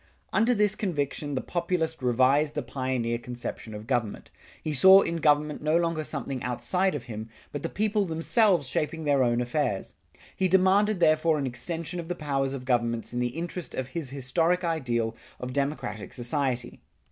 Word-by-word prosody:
Under 235 Hz, +3 st, +3 dB
this 210 Hz, -1 st, +3 dB
conviction 145 Hz, -7 st, -2 dB
the 130 Hz, -, -1 dB
Populist 170 Hz, -3 st, -2 dB
revised 130 Hz, +5 st, +3 dB
the 150 Hz, -, -1 dB
pioneer 125 Hz, -2 st, -2 dB
conception 120 Hz, -2 st, -6 dB
of 105 Hz, +1 st, -8 dB
government. 115 Hz, -4 st, -2 dB, 0.3 s
He 155 Hz, -, -2 dB
saw 190 Hz, +7 st, +8 dB
in 170 Hz, -, -1 dB
government 150 Hz, -1 st, +2 dB
no 155 Hz, +2 st, +2 dB
longer 165 Hz, -2 st, 0 dB
something 135 Hz, -1 st, -4 dB
outside 180 Hz, +10 st, 0 dB
of 140 Hz, -, -4 dB
him, 110 Hz, -2 st, -7 dB, 0.2 s
but 145 Hz, -, -4 dB
the -, -, -3 dB
people 210 Hz, -1 st, +1 dB
themselves 170 Hz, -, +2 dB
shaping 155 Hz, +4 st, -2 dB
their 145 Hz, -2 st, +3 dB
own 120 Hz, -1 st, +2 dB
affairs. 120 Hz, -5 st, -1 dB, 0.4 s
He 190 Hz, -, +2 dB
demanded 190 Hz, +2 st, +4 dB
therefore 155 Hz, 0 st, +4 dB
an 140 Hz, -, -1 dB
extension 165 Hz, +7 st, -4 dB
of 170 Hz, -, -6 dB
the 175 Hz, -, -2 dB
powers 140 Hz, -4 st, -1 dB
of 130 Hz, -2 st, -7 dB
governments 120 Hz, -2 st, 0 dB
in 120 Hz, -, -1 dB
the 125 Hz, +4 st, -2 dB
interest 175 Hz, 0 st, -5 dB
of 130 Hz, 0 st, -3 dB
his 145 Hz, 0 st, -4 dB
historic 160 Hz, +7 st, 0 dB
ideal 120 Hz, -9 st, -1 dB, 0.2 s
of 125 Hz, 0 st, -5 dB
democratic 140 Hz, -7 st, -3 dB
society. 125 Hz, -1 st, -2 dB
145 Hz, 170 wpm, -27 LUFS, 125-170 Hz, 0.4 s, saw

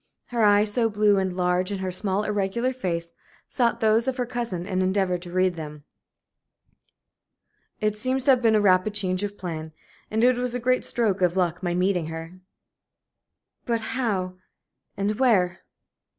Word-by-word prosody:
Her 235 Hz, -2 st, 0 dB
eyes, 205 Hz, 0 st, +4 dB
so 230 Hz, -1 st, +2 dB
blue 205 Hz, -1 st, +3 dB
and 190 Hz, -1 st, -2 dB
large 180 Hz, +1 st, +1 dB
in 200 Hz, -, -2 dB
her 190 Hz, -1 st, -3 dB
small, 195 Hz, +2 st, -1 dB
irregular 210 Hz, +5 st, -1 dB
face, 170 Hz, -8 st, -3 dB, 0.3 s
sought 235 Hz, -2 st, 0 dB
those 220 Hz, +2 st, +3 dB
of 265 Hz, 0 st, -1 dB
her 250 Hz, -, 0 dB
cousin 235 Hz, -8 st, -4 dB
and 185 Hz, -1 st, -1 dB
endeavored 185 Hz, -1 st, 0 dB
to 175 Hz, -1 st, -9 dB
read 185 Hz, 0 st, +2 dB
them. 150 Hz, -2 st, -8 dB, 2.0 s
"It 215 Hz, -1 st, 0 dB
seems 255 Hz, +4 st, -1 dB
to 275 Hz, -, +5 dB
have 255 Hz, -2 st, +3 dB
been 225 Hz, -2 st, +4 dB
a 210 Hz, -, +4 dB
rapid 195 Hz, +1 st, +3 dB
change 185 Hz, -2 st, 0 dB
of 205 Hz, 0 st, -4 dB
plan. 160 Hz, -3 st, -6 dB, 0.4 s
And 220 Hz, +2 st, 0 dB
it 250 Hz, 0 st, +4 dB
was 250 Hz, 0 st, -2 dB
a -, -, -1 dB
great 255 Hz, +1 st, +1 dB
stroke 210 Hz, -5 st, 0 dB
of 180 Hz, 0 st, +2 dB
luck 180 Hz, -1 st, 0 dB
my 175 Hz, -2 st, -1 dB
meeting 180 Hz, -2 st, +1 dB
her." 165 Hz, +2 st, -8 dB, 1.3 s
"But 230 Hz, -1 st, 0 dB
how 190 Hz, -8 st, -1 dB, 0.6 s
and 205 Hz, +3 st, -1 dB
where?" 190 Hz, -8 st, +3 dB
200 Hz, 170 wpm, -25 LUFS, 180-230 Hz, 2.0 s, to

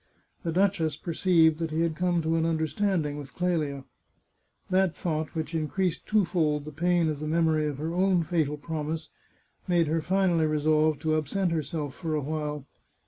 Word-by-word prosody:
The 170 Hz, -, -2 dB
duchess 170 Hz, -4 st, +1 dB
perceived 165 Hz, -2 st, +3 dB
that 165 Hz, -1 st, -2 dB
he 155 Hz, +1 st, -1 dB
had 165 Hz, -2 st, 0 dB
come 175 Hz, -1 st, +1 dB
to 160 Hz, +1 st, +1 dB
an 165 Hz, -, +1 dB
understanding 160 Hz, -1 st, 0 dB
with 140 Hz, -2 st, -10 dB
Clelia. 155 Hz, -6 st, -1 dB, 0.9 s
That 185 Hz, -2 st, +2 dB
thought, 155 Hz, -2 st, -3 dB
which 160 Hz, 0 st, -3 dB
increased 165 Hz, +2 st, -1 dB
twofold 165 Hz, -8 st, +1 dB
the 155 Hz, -, -7 dB
pain 175 Hz, +2 st, +2 dB
of 155 Hz, -2 st, -2 dB
the 155 Hz, -, -4 dB
mem 165 Hz, +1 st, +2 dB
ory 155 Hz, -1 st, +1 dB
of 145 Hz, -3 st, -3 dB
her 160 Hz, +3 st, -3 dB
own 185 Hz, -1 st, +2 dB
fatal 155 Hz, -3 st, 0 dB
promise, 155 Hz, +1 st, -4 dB, 0.6 s
made 175 Hz, -2 st, +3 dB
her 160 Hz, +2 st, 0 dB
finally 180 Hz, -2 st, +2 dB
resolve 155 Hz, 0 st, +2 dB
to 155 Hz, -1 st, +1 dB
absent 170 Hz, +4 st, 0 dB
herself 150 Hz, -2 st, -2 dB
for 160 Hz, -1 st, -3 dB
a 150 Hz, -, 0 dB
while. 150 Hz, -1 st, -3 dB
160 Hz, 175 wpm, -27 LUFS, 155-175 Hz, 0.9 s, perceived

